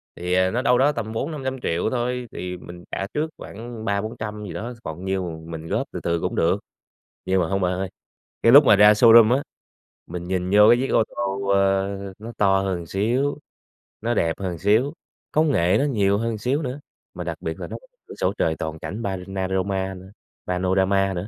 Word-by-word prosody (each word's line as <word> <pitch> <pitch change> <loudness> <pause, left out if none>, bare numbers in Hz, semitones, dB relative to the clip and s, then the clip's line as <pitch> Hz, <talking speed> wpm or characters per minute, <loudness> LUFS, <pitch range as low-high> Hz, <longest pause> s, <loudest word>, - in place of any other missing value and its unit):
thì 90 +1 -1 0.2
nó 120 +2 0
đâu 125 -1 +3
đó 140 +3 +4
tầm 110 -4 -4
400.000.000-500.000.000 130 - -2
thôi 125 0 -2
thì 90 0 -5
mình 85 0 -11
trả 95 - -3
trước 155 +2 -1
khoảng 115 +1 -8
ba 100 -1 0
bốn 110 +1 -6
trăm 105 -1 -5
gì - - -7
đó, 120 +3 -5
còn 85 +4 -6
nhiêu 90 -4 -3
mình 80 -1 -7
góp - - -1
từ - - -5
từ 85 0 0
cũng - - -2
được. - - +2 0.7
Nhưng 95 0 +2
mà 85 - 0
hông 95 0 0
bạn 90 -1 +1
ơi, 95 +1 -3 0.5
cái 115 - +6
lúc 145 +1 +10
mà 100 - +6
ra 105 +1 +8
showroom 115 +2 +7
á, 140 - -2 0.7
mình 85 0 -6
nhìn 90 -1 -1
vô 105 +1 +7
cái 120 - +6
chiếc 135 +2 -1
ô 115 - +5
tô, 100 0 -2
ơ, 100 0 +1
nó 115 +2 -8
to 95 -1 +3
hơn 90 -3 -2
xíu, 120 - 0 0.6
nó 120 +2 0
đẹp 80 -7 +1
hơn 90 -3 -3
xíu, 110 - +2 0.4
công 155 -1 +3
nghệ 90 -1 +3
nó 145 - +2
nhiều 100 -7 +2
hơn 115 0 -2
xíu 130 +8 0
nữa, 130 +1 -4 0.3
mà - - -5
đặc - - -4
biệt - - -4
là - - -5
nó - - -6
có - - -21 0.2
cửa - - -10
sổ 95 - +1
trời 80 -1 +1
toàn 80 0 -4
cảnh 105 +5 -6
panorama 95 0 -2
nữa 95 +1 -12 0.4
panorama 95 +2 +1
nữa. 90 +3 -4
100 Hz, 210 wpm, -23 LUFS, 95-115 Hz, 0.7 s, lúc